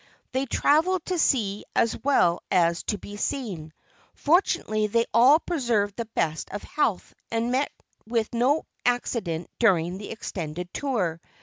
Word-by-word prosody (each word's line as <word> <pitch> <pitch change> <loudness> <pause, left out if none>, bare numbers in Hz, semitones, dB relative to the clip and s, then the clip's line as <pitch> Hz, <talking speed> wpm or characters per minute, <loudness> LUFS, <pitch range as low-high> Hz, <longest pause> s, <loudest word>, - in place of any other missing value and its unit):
They 265 +1 -1
travelled 320 +8 +2
to 365 -2 -1
see 210 -9 +1
as 230 - +2
well 180 -11 +3
as 170 -2 +2
to 210 - -1
be 205 +1 -9
seen. 195 - -3 0.4
Fortunately 250 - +2
they 230 +2 +2
all 250 +6 +7
preserved 235 - 0
the 235 - -3
best 160 0 -1
of 205 - -6
health 245 -10 -1 0.2
and 230 +1 -1
met 265 +3 +1 0.4
with 225 -1 -1
no 255 +6 +2 0.2
accident 225 -9 -1
during 180 -5 +2
the 205 - -8
extended 175 -5 -5
tour. 190 - -1
225 Hz, 140 wpm, -26 LUFS, 185-265 Hz, 0.4 s, all